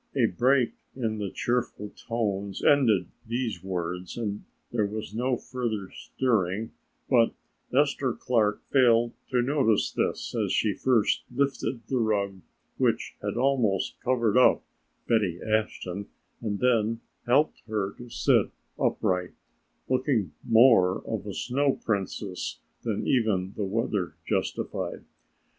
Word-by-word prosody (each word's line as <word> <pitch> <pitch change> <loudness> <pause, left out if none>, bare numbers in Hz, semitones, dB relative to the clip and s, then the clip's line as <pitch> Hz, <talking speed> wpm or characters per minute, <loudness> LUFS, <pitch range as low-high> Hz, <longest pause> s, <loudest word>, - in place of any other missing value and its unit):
A - - +4
break 125 +5 +3 0.2
in 110 -4 -2
the 100 -2 -2
cheerful 120 -3 -2
tones 100 -4 -3
ended 115 -10 +4 0.2
these 115 -6 -2
words 90 0 -4
and 105 -3 -3 0.3
there 110 -4 +1
was 105 0 -6
no 125 +2 0
further 115 -7 -4
stirring, 110 -4 -1 0.4
but 120 -3 +4 0.4
Esther 140 -1 +2
Clark 110 -5 +1
failed 120 -3 +4 0.2
to 125 -2 +2
notice 130 -6 +2
this, - - -2
as - - 0
she - - +2
first 120 -5 +2
lifted 130 -2 -1
the 130 - 0
rug 100 -4 0 0.4
which - - 0
had - - -3
almost 120 -7 +1
covered 120 -2 +2
up 125 - +5 0.4
Betty 100 -7 +1
Ashton 105 -3 -2 0.3
and 105 -3 -2
then 115 -1 +2 0.3
helped 140 +6 +3
her 105 -3 -1
to 120 0 -9
sit - - +3 0.3
upright, 90 -1 0 0.5
looking 125 - +1
more 110 -6 +5
of - - -4
a - - -4
Snow 140 +2 +1
Princess 100 -2 -3 0.2
than - - -2
even 105 -7 +1
the 105 - -2
weather 100 -3 -1
justified. - - -2
110 Hz, 125 wpm, -27 LUFS, 100-125 Hz, 0.5 s, up